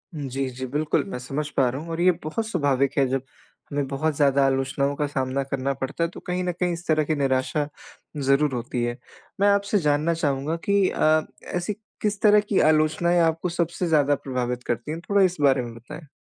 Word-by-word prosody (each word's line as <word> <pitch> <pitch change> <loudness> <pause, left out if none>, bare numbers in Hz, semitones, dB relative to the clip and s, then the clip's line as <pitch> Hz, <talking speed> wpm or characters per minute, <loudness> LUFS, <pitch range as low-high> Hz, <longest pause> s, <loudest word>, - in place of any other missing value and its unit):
उम, 145 -2 -4
जी, 135 +1 -2
जी, 130 +1 -6
बिल्कुल 150 +3 0
मैं 125 - -5
समझ 140 +4 -3
पा 130 - +4
रहा 135 +4 -4
हूँ 165 - -9
और 165 +1 -2
ये 180 +1 +6
बहुत 220 +9 -3
स्वाभाविक 145 - +1
है 135 - +4
जब 135 0 -1 0.5
हमें 140 -1 -1
बहुत 145 +2 -1
ज़्यादा 140 -1 +3
आलोचनाओं 135 +1 0
का 145 0 -1
सामना 135 -1 -1
करना 135 0 -2
पड़ता 135 +5 -3
है 165 - 0
तो - - -10
कहीं 180 0 -1
न 180 - 0
कहीं 175 0 -1
इस 170 +1 -7
तरह 155 -1 +3
की 155 +1 -1
निराशा 140 +2 0 0.5
ज़रूर 140 0 +2
होती 120 0 -2
है। 120 0 -2 0.4
मैं 200 - +4
आपसे 200 +1 +2
जानना 150 +2 +1
चाहूँगा 145 0 -1
कि 200 -2 +4
अ, 155 0 +3 0.4
ऐसी 180 +4 -2 0.3
किस 210 -1 -1
तरह 210 -1 +6
की 200 - +3
आलोचनाएँ 155 +3 +2
आपको 165 +2 +1
सबसे 170 +1 -1
ज़्यादा 145 -3 +3
प्रभावित 125 -2 -3
करती 120 +5 -3
हैं, 165 - -4
थोड़ा 200 0 +4
इस 185 -2 +3
बारे 135 -2 +4
में 120 -1 -7
बताएँ? 150 +7 -11
145 Hz, 210 wpm, -24 LUFS, 135-170 Hz, 0.5 s, ये